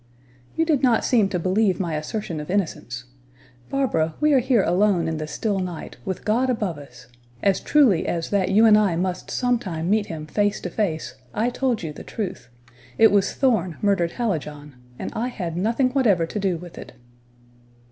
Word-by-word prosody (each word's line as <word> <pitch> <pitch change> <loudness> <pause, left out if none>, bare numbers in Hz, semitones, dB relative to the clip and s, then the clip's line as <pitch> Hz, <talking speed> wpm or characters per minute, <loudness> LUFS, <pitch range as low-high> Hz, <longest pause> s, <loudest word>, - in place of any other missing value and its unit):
"You 325 - +2
did 305 -5 +2
not 245 -4 +3
seem 220 -6 +3
to 185 - -1
believe 190 +3 +1
my 170 -4 -2
assertion 165 +2 -4
of 150 - -7
innocence. 155 -10 -2 0.7
Barbara, 165 - 0
we 300 -1 +3
are 270 - +6
here 245 -4 +2
alone 180 -1 +2
in 160 -1 -2
the 155 0 -4
still 195 +6 -2
night, 180 -3 -6
with 190 -3 -4
God 240 +5 +2
above 205 - -1
us; 140 -2 -14 0.4
as 195 -2 +3
truly 255 - +3
as 165 -1 -2
that 195 -3 +1
you 215 +4 +5
and 215 -1 +7
I 200 -5 +2
must 180 +1 -3
sometime 200 -9 -1
meet 215 -1 +2
Him 155 -2 -6
face 205 +6 0
to 180 - -5
face, 160 - -2 0.2
I 230 +3 +1
told 245 -6 -1
you 155 -2 -4
the - - -10
truth. 185 - -5 0.5
It 225 - +6
was 200 -1 +2
Thorn 195 - +1
murdered 185 -4 +2
Hallijohn, 150 - -3 0.2
and - - -5
I 235 +3 -1
had 180 -10 -5
nothing 230 +8 +1
whatever 215 -11 +3
to 210 - -5
do 190 -3 0
with 175 0 -11
it." - - -10
195 Hz, 190 wpm, -23 LUFS, 165-225 Hz, 0.7 s, and